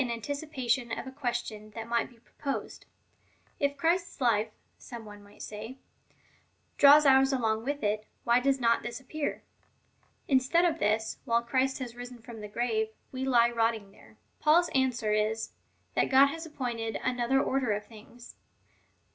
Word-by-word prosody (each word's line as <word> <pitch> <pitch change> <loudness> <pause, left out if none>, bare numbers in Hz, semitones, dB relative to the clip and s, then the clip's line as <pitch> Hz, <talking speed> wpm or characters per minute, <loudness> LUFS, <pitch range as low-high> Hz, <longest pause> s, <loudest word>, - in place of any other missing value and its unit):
XV. 255 - 0
24. 235 +4 -3
pation 245 -4 -1
of - - -6
a 265 - -7
question 240 -5 -4
that 225 0 -6
might 235 0 0
be 240 - -20
proposed: 275 +4 -6 0.4
" - - -37
If 280 0 0
Christ's 345 +4 0
life/' 225 -4 +2 0.3
some 235 -3 -9
one 205 -1 -11
might 205 0 -13
say, 220 +5 -7 0.5
" - - -38
draws 290 +1 +8
ours 270 0 +6
along 225 -3 0
with 285 -1 -2
it, 210 +1 -1 0.2
whj 240 +1 +4
does 275 +1 +2
not 230 -1 +3
this 240 +2 -5
appear? 285 +3 -4 0.8
Instead 275 +6 +3
of 330 -2 +1
this, 220 +1 0
while 235 0 +2
Christ 260 +2 +1
has 245 -3 -6
risen 245 0 -8
from 230 -1 -11
the 210 - -6
grave, 220 0 -1 0.2
we 260 0 -3
lie 240 -2 +4
rotting 225 -3 0
there." - - -19 0.2
Paul's 335 +3 +4
answer 250 -5 +1
is, 215 +1 0 0.4
that - - +1
God 275 +1 +6
has 325 +2 -6
appointed 235 -7 -4
another 250 +1 +1
order 265 -4 0
of 205 0 -2
things. 230 +2 -14
240 Hz, 170 wpm, -29 LUFS, 225-270 Hz, 0.8 s, draws